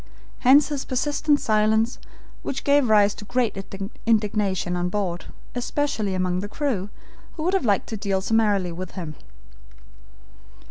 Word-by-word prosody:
Hence 275 +3 +6
his 285 -2 -2
persistent 290 +3 +1
silence, 220 +2 +2 0.4
which 270 0 -4
gave 285 -4 +3
rise 205 -1 +5
to - - -10
great 245 0 0 0.5
indignation 205 -5 +1
on 175 0 -1
board, 180 -3 -2 0.3
especially 245 -5 -1
among 180 -1 0
the 205 +2 -5
crew, 215 -8 -2 0.4
who 310 - -5
would 360 +3 +1
have 385 -9 +1
liked 200 -4 +2
to 220 - -3
deal 195 -1 0
summarily 205 -3 +1
with 180 +2 -7
him. 165 -5 -6
215 Hz, 140 wpm, -24 LUFS, 190-255 Hz, 0.5 s, Hence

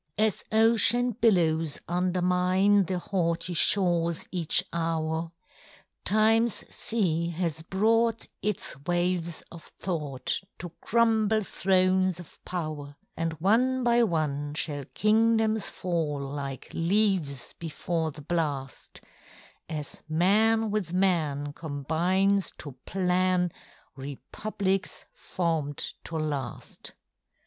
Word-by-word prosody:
As 215 -2 +1
ocean 230 +2 +4
billows 165 - +2
undermine 180 +2 +2
The 185 +2 -2
haughty 175 -1 -1
shores 170 -2 +2
each 170 -4 +1
hour, 165 0 -1 0.7
TimeŌĆÖs 225 +2 +3
sea 170 -7 +1
has 165 -2 -2
brought 225 +6 +1 0.2
its 210 -1 -2
waves 175 -1 0
of 170 -2 -11
thought 150 -8 -3 0.2
To 175 - -7
crumble 220 -2 +2
thrones 185 -1 +2
of 175 - -13
power; 155 -5 -5 0.2
And 165 0 -2
one 235 +10 +2
by 240 0 +4
one 150 -7 -1
shall 145 -3 -2
kingdoms 220 - +2
fall 165 -5 -2
Like 140 -1 -6
leaves 170 - +1
before 165 0 -2
the 150 -1 -11
blast, 145 -5 -3 0.7
As 150 -3 -5
man 215 +7 +3
with 190 -5 -2
man 155 -7 +1
combines 170 +7 0
to 145 - -7 0.2
plan 180 -1 +1 0.4
Republics 190 +8 -3
formed 165 - -2
to 165 - -4
last. 145 -6 -5
175 Hz, 100 wpm, -27 LUFS, 160-205 Hz, 0.7 s, ocean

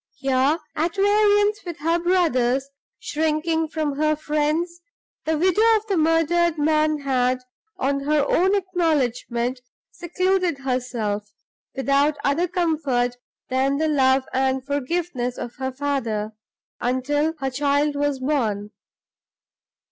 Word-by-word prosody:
Here, 270 +2 +2 0.2
at 330 +2 -1
variance 415 +1 +3
with 345 -3 -6
her 330 +3 +1
brothers, 275 -8 +1 0.3
shrinking 320 +1 -1
from 305 -3 -2
her 305 0 +2
friends, 310 +3 -1 0.4
the 320 0 +1
widow 370 +5 +2
of 430 0 -1
the 405 -3 -1
murdered 330 +1 +2
man 305 0 +2
had, 255 -2 +1 0.4
on 275 -1 0
her 295 -1 +2
own 380 +3 +3
acknowledgment, 260 - -1 0.3
secluded 365 -1 0
herself, 240 -6 -3 0.4
without 280 +2 +2
other 310 +6 +1
comfort 295 -9 0 0.3
than 270 +2 +1
the 315 +1 +1
love 265 -2 +3
and 265 0 0
forgiveness 285 -2 -2
of 240 - -7
her 260 0 -3
father, 255 -6 -2 0.5
until 290 +6 0
her 270 -2 -3
child 285 +2 +1
was 290 -1 0
born. 225 -7 -1
290 Hz, 115 wpm, -23 LUFS, 260-330 Hz, 0.5 s, variance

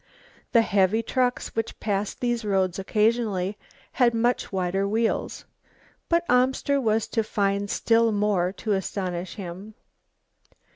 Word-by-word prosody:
The 230 -2 +6
heavy 200 +2 +2
trucks 250 +1 -1
which 225 0 -3
passed 205 -1 -2
these 240 -1 0
roads 190 -3 0
occasionally 210 -2 0 0.4
had 240 -3 +2
much 240 +2 0
wider 190 +1 0
wheels. 225 +2 -1 0.6
But 340 0 +2
Amster 265 +3 +2
was 220 -2 +1
to 225 - 0
find 200 -1 -1
still 230 +1 +2
more 205 -4 +1
to 215 - -4
astonish 185 -2 -2
him. 195 +2 -8
210 Hz, 125 wpm, -25 LUFS, 195-230 Hz, 0.6 s, The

